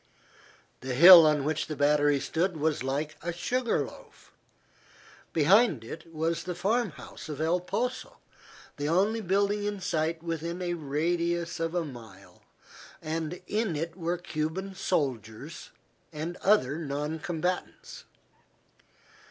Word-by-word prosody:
The 130 Hz, -1 st, -4 dB
hill 170 Hz, +2 st, +10 dB
on 150 Hz, -2 st, +2 dB
which 155 Hz, +1 st, -1 dB
the 155 Hz, -, -4 dB
battery 145 Hz, 0 st, +3 dB
stood 170 Hz, +4 st, -1 dB
was 155 Hz, 0 st, 0 dB
like 140 Hz, +4 st, -3 dB
a 175 Hz, -, -3 dB
sugar 240 Hz, +8 st, -1 dB
loaf. -, -, -15 dB, 1.0 s
Behind 165 Hz, -, +4 dB
it 160 Hz, +8 st, -9 dB
was 165 Hz, +1 st, -2 dB
the 180 Hz, -1 st, -4 dB
farm 210 Hz, +6 st, +1 dB
house 155 Hz, -, -11 dB
of 150 Hz, -2 st, -5 dB
El 165 Hz, +3 st, +1 dB
Poso, 245 Hz, +8 st, -3 dB, 0.6 s
the 145 Hz, +1 st, -2 dB
only 205 Hz, +7 st, +2 dB
building 200 Hz, +2 st, +1 dB
in 205 Hz, -1 st, -2 dB
sight 165 Hz, -2 st, -1 dB
within 165 Hz, +1 st, -4 dB
a 175 Hz, -1 st, -2 dB
radius 170 Hz, +3 st, -1 dB
of 165 Hz, +1 st, -2 dB
a 175 Hz, -2 st, 0 dB
mile, 105 Hz, -9 st, -12 dB, 0.6 s
and 160 Hz, +2 st, -4 dB
in 215 Hz, -5 st, -1 dB
it 165 Hz, +2 st, -4 dB
were 175 Hz, -1 st, -2 dB
Cuban 175 Hz, +3 st, -4 dB
soldiers 140 Hz, -, -3 dB, 0.4 s
and 160 Hz, +3 st, -5 dB
other 160 Hz, -8 st, +2 dB
non 150 Hz, +1 st, -3 dB
combatants. 175 Hz, +3 st, -4 dB
165 Hz, 130 wpm, -28 LUFS, 150-180 Hz, 1.0 s, hill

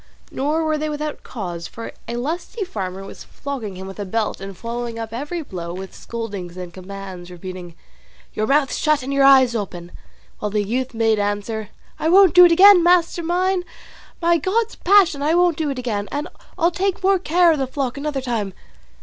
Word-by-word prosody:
Nor 300 Hz, +4 st, 0 dB
were 310 Hz, -1 st, 0 dB
they 310 Hz, 0 st, -2 dB
without 300 Hz, 0 st, -4 dB
cause, 175 Hz, -7 st, -6 dB
for 230 Hz, +5 st, -8 dB, 0.2 s
a 235 Hz, -, -4 dB
lusty 335 Hz, -, -3 dB
farmer 195 Hz, -, -5 dB
was 195 Hz, -, -10 dB
flogging 255 Hz, -9 st, -6 dB
him 190 Hz, +1 st, -8 dB
with 195 Hz, +2 st, -9 dB
a -, -, -2 dB
belt 210 Hz, +1 st, -2 dB
and 195 Hz, -1 st, -8 dB
following 235 Hz, +2 st, -5 dB
up 225 Hz, -1 st, -6 dB
every 295 Hz, +7 st, -4 dB
blow 175 Hz, -, -6 dB
with 190 Hz, +1 st, -8 dB
scoldings 200 Hz, -7 st, -6 dB
and 180 Hz, -2 st, -7 dB
commands, 185 Hz, -1 st, -9 dB
repeating, 180 Hz, -1 st, -8 dB, 0.6 s
"Your 215 Hz, -, -1 dB
mouth 280 Hz, -1 st, +2 dB
shut 305 Hz, -3 st, +1 dB
and 275 Hz, +2 st, -3 dB
your 275 Hz, 0 st, +3 dB
eyes 265 Hz, -3 st, +6 dB
open!" 175 Hz, -5 st, -5 dB, 0.5 s
while 210 Hz, -, -2 dB
the 210 Hz, 0 st, 0 dB
youth 245 Hz, +4 st, -2 dB
made 225 Hz, -1 st, +2 dB
answer, 205 Hz, +1 st, -2 dB, 0.3 s
"I 320 Hz, -, +1 dB
won't 380 Hz, 0 st, +6 dB
do 360 Hz, 0 st, +9 dB
it 345 Hz, -, +5 dB
again, 380 Hz, +2 st, +8 dB
master 345 Hz, 0 st, +3 dB
mine; 360 Hz, +2 st, 0 dB, 0.6 s
by 340 Hz, 0 st, +3 dB
God's 415 Hz, +8 st, 0 dB
passion 360 Hz, -6 st, +4 dB
I 305 Hz, +3 st, +2 dB
won't 350 Hz, -2 st, +4 dB
do 310 Hz, -1 st, -2 dB
it 275 Hz, -, -3 dB
again, 215 Hz, -5 st, -3 dB
and 295 Hz, +3 st, -3 dB, 0.3 s
I'll 340 Hz, +2 st, +3 dB
take 375 Hz, +2 st, -1 dB
more 385 Hz, 0 st, +4 dB
care 350 Hz, 0 st, +4 dB
of 310 Hz, -, 0 dB
the 265 Hz, -, -1 dB
flock 260 Hz, -1 st, -3 dB
another 280 Hz, -1 st, -3 dB
time." 225 Hz, -7 st, -3 dB
255 Hz, 195 wpm, -21 LUFS, 205-330 Hz, 0.6 s, do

